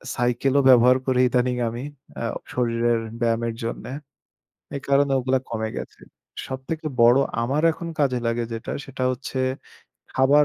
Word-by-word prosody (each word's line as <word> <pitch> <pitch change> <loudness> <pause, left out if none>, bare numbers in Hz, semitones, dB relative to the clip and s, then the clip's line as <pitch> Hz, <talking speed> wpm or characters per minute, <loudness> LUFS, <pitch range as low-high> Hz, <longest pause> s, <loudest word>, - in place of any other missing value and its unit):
সাইকেলও 125 +3 +2
ব্যবহার 125 0 +7
করি 130 -1 +1
ইদানিং 125 0 +1
আমি। 120 +3 -6 0.4
আ - - -2 0.3
শরীরের 120 -1 +1 0.2
ব্যায়ামের 115 0 +1
জন্যে। 115 +2 -4 0.9
এই - - -4
কারণে 140 0 +3
ওগুলা 130 +1 +1
কমে 110 -1 -2
গেছে। - - -7 0.5
সবথেকে 145 +5 -5 0.2
বড় 120 +3 +7 0.2
আমার 140 +6 0
এখন 170 +1 -7
কাজে 130 -4 +2
লাগে 115 0 0
যেটা 115 - -5
সেটা 135 -1 -6
হচ্ছে 130 +1 -4 0.7
খাবার 140 +3 +5
125 Hz, 140 wpm, -24 LUFS, 120-135 Hz, 0.9 s, ব্যবহার